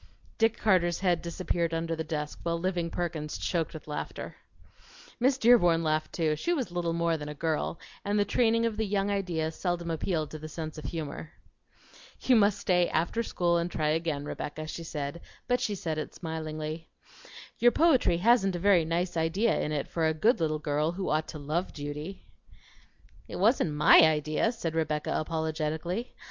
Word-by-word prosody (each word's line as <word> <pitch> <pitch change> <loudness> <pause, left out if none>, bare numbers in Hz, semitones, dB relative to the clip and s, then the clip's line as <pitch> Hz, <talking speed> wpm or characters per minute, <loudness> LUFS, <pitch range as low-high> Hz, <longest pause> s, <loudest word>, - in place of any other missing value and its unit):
Dick 225 -1 +3
Carter's 175 -5 +2
head 180 -3 +2
disappeared 170 -1 -2
under 165 0 -1
the 160 - -3
desk, 150 -2 -4
while 170 0 -1
Living 175 -1 -1
Perkins 160 -3 -3
choked 165 -3 -2
with 155 - -9
laughter. 150 -1 -5 0.8
Miss 260 +2 +3
Dearborn 175 -10 +5
laughed 155 0 0
too; 155 -3 0
she 345 - -1
was 255 - -3
little 175 -1 -1
more 170 -1 +1
than 150 -1 -6
a 150 - -6
girl, 160 +1 -1 0.3
and 205 +1 0
the 205 - +3
training 230 0 +2
of 225 -2 -1
the 220 - +1
young 200 0 0
idea 175 -5 -1
seldom 170 0 -2
appealed 160 -1 -1
to 155 - -7
the 155 +1 -8
sense 155 0 -6
of - - -10
humor. 160 -1 -5 0.9
"You 255 - +3
must 205 -2 +4
stay 180 -3 +2
after 170 +8 0
school 175 -6 +1
and 170 +1 -1
try 155 -3 -1
again, 155 -2 -1
Rebecca," 155 +1 -5
she 165 +2 -6
said, 150 0 -5 0.3
but 245 0 +1
she 210 - -1
said 160 -4 -3
it - - -6
smilingly. 155 -1 -5 0.7
"Your 240 0 +6
poetry 285 - +4
hasn't 195 -1 +3
a - - -1
very 180 -2 +4
nice 175 +2 -1
idea 170 +8 +1
in 150 - -2
it 145 -2 -2
for 165 -2 0
a 160 - 0
good 220 +9 +3
little 155 -2 0
girl 150 +2 0
who 190 +1 -3
ought 155 +1 +1
to - - -7
love 155 +5 -2
duty." 150 +5 -6 1.0
"It - - -7
wasn't 200 - +2
MY 150 +2 +7
idea," 155 +5 +3
said 170 -9 -4
Rebecca 155 -2 -1
apologetically. 160 +6 -2
165 Hz, 180 wpm, -29 LUFS, 155-190 Hz, 1.0 s, MY